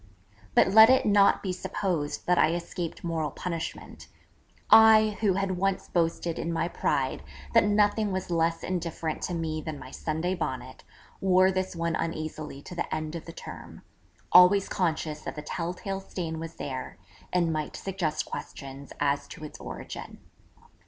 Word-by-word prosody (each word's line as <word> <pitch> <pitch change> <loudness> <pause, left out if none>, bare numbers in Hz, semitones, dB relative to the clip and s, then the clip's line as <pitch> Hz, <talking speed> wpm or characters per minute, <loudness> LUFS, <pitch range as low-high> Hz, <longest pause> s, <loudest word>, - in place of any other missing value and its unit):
But - - +6
let 220 +3 +9
it 260 0 +4
not 200 -1 +4
be 190 -2 -1
supposed 175 -5 -2
that 180 0 +3
I 165 - +4
escaped 175 -1 -5
moral 165 -3 -1
punishment: 165 +3 -6 0.6
I, 220 -1 +7
who 205 -4 +3
had 190 -1 -1
once 195 0 0
boasted 170 -1 0
in 170 - -2
my 165 0 0
pride 135 -6 -1 0.3
that 230 -2 +6
nothing 205 0 +2
was 185 -1 -3
less 165 0 +1
indifferent 170 -3 -3
to 180 - -2
me 160 -1 -2
than 155 -1 -5
my 130 -1 -10
Sunday 160 +5 -2
Bonnet, 185 - -5 0.4
wore 185 0 +4
this 185 -1 -2
one 170 -1 -1
uneasily 155 -3 -4
to - - -9
the 175 - -3
end 155 0 -3
of 170 - -6
the 165 - -8
term, - - -10 0.5
always 185 +2 +7
conscious 160 -4 -1
that - - -6
the 150 - -6
tell 170 +2 -3
tale 195 +1 -4
stain 165 -4 -5
was 165 0 -7
there, 130 -2 -6 0.3
and 170 -2 +2
might 155 -1 -3
suggest 175 -6 -2
questions 135 0 -8
as 140 0 0
to 155 - -10
its 150 - -10
origin. - - -8
170 Hz, 165 wpm, -28 LUFS, 155-190 Hz, 0.6 s, let